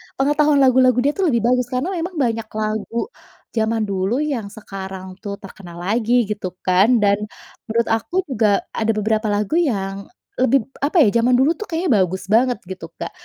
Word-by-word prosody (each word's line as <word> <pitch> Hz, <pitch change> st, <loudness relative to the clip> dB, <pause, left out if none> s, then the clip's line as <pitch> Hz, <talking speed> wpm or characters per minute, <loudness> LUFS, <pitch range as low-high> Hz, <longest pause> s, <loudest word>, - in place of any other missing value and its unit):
pengetahuan 295 Hz, +1 st, +3 dB
lagu-lagu 255 Hz, -1 st, +5 dB
dia 285 Hz, -, +3 dB
tuh 385 Hz, -, +2 dB
lebih 235 Hz, -7 st, +2 dB
bagus, 250 Hz, 0 st, +2 dB
karena 255 Hz, +8 st, -1 dB
memang 345 Hz, +2 st, -4 dB
banyak 225 Hz, -2 st, -1 dB
lagu 215 Hz, +1 st, -3 dB, 0.6 s
zaman 225 Hz, -1 st, 0 dB
dulu 195 Hz, +3 st, 0 dB
yang 265 Hz, -9 st, -2 dB
sekarang 195 Hz, -2 st, -8 dB
tuh 200 Hz, -2 st, -5 dB
terkenal 185 Hz, -3 st, -11 dB
lagi 220 Hz, +4 st, 0 dB, 0.2 s
gitu 205 Hz, -3 st, -3 dB, 0.2 s
kan, 185 Hz, +3 st, +4 dB, 0.2 s
dan 200 Hz, 0 st, +4 dB, 0.5 s
menurut 230 Hz, +1 st, 0 dB
aku 225 Hz, +10 st, -1 dB
juga 215 Hz, -5 st, +2 dB
ada 225 Hz, 0 st, 0 dB
beberapa 215 Hz, +1 st, 0 dB
lagu 210 Hz, -, +1 dB
yang 200 Hz, -, -2 dB, 0.3 s
lebih 260 Hz, +1 st, +4 dB, 0.2 s
apa 305 Hz, +4 st, +3 dB
ya, 235 Hz, 0 st, +3 dB
zaman 245 Hz, +2 st, +3 dB
dulu 265 Hz, +5 st, +4 dB
tuh 430 Hz, -, -6 dB
kayaknya 335 Hz, +1 st, -2 dB
bagus 185 Hz, 0 st, 0 dB
banget 245 Hz, +2 st, +3 dB
gitu 185 Hz, -2 st, -8 dB
Kak. -, -, -5 dB
225 Hz, 170 wpm, -20 LUFS, 200-260 Hz, 0.6 s, lagu-lagu